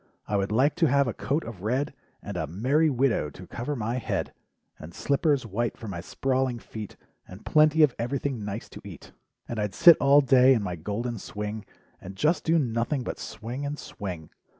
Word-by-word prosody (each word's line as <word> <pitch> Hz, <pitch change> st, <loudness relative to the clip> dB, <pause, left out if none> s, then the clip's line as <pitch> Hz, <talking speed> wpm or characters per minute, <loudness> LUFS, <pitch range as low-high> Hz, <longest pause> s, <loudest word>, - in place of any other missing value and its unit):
I 105 Hz, -, -1 dB
would 100 Hz, 0 st, 0 dB
like 130 Hz, +7 st, +3 dB
to 165 Hz, -, +4 dB
have 140 Hz, 0 st, +3 dB
a 120 Hz, -, -2 dB
coat 145 Hz, +4 st, -1 dB
of 115 Hz, -6 st, -9 dB
red, 125 Hz, +7 st, -1 dB, 0.3 s
And -, -, -6 dB
a -, -, -2 dB
'merry 130 Hz, -, +2 dB
widow' 125 Hz, -, +1 dB
to 90 Hz, -, -12 dB
cover 125 Hz, +10 st, -4 dB
my 115 Hz, 0 st, -2 dB
head, -, -, -3 dB, 0.5 s
And 80 Hz, +2 st, -10 dB
slippers 140 Hz, -2 st, +1 dB
white 115 Hz, +3 st, -2 dB
for 115 Hz, -, -8 dB
my 85 Hz, -4 st, -5 dB
sprawling 130 Hz, +5 st, -1 dB
feet, 110 Hz, -2 st, -9 dB, 0.3 s
And 95 Hz, +3 st, -12 dB
plenty 155 Hz, +1 st, +5 dB
of 140 Hz, -5 st, +4 dB
everything 130 Hz, -1 st, -2 dB
nice 105 Hz, +2 st, -5 dB
to -, -, -11 dB
eat -, -, -11 dB, 0.4 s
And 115 Hz, -, -4 dB
I'd 105 Hz, -2 st, -2 dB
sit 170 Hz, -2 st, +8 dB
all 140 Hz, +1 st, +6 dB
day 130 Hz, -1 st, +6 dB
in 110 Hz, -, -1 dB
my 90 Hz, -3 st, -3 dB
golden 105 Hz, +7 st, -4 dB
swing. 105 Hz, +2 st, -5 dB, 0.4 s
And 95 Hz, +1 st, -9 dB
just 155 Hz, -, +1 dB
do 165 Hz, +1 st, +3 dB
nothing 125 Hz, 0 st, 0 dB
but -, -, -5 dB
swing 120 Hz, +5 st, -6 dB
and 145 Hz, +1 st, -3 dB
swing. 90 Hz, -, -7 dB
120 Hz, 195 wpm, -27 LUFS, 105-140 Hz, 0.5 s, sit